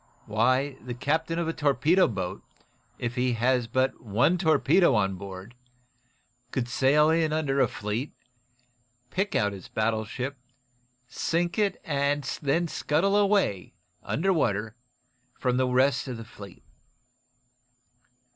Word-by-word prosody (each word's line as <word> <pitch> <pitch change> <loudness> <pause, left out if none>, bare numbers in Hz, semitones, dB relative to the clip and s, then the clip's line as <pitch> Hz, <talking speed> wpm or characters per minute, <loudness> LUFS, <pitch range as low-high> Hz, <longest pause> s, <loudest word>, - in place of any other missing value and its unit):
Why, 130 +6 +1
the 120 -1 -5
captain 160 +6 -1
of 170 -1 -1
a 165 - -1
torpedo 150 +5 +3
boat, 95 -4 -4 0.6
if 120 -1 -3
he 125 0 0
has 120 +1 +1
but 130 +3 0
one 120 - +1
torpedo 160 -2 +4
on 95 -3 +1
board, 95 +3 -9 1.0
could 125 -1 -2
sail 140 +5 +3
in 160 -1 +2
under 145 -3 0
a 130 - +4
fleet, 105 +7 -4 1.0
pick 195 +3 -1
out 105 -1 +1
his 95 - -10
battleship, 115 +5 -2 0.7
sink 170 +8 -1
it 205 -2 +1
and 145 -2 0 0.2
then 160 +4 +1
scuttle 165 +6 0
away, 200 - +1 0.3
under 190 +5 0
water, 110 - -1 0.6
from 125 -1 0
the 130 0 +2
rest 130 +2 +2
of 125 -3 -5
the - - -8
enemy's 115 - -14
fleet." 100 -3 -12
130 Hz, 130 wpm, -27 LUFS, 115-160 Hz, 1.0 s, torpedo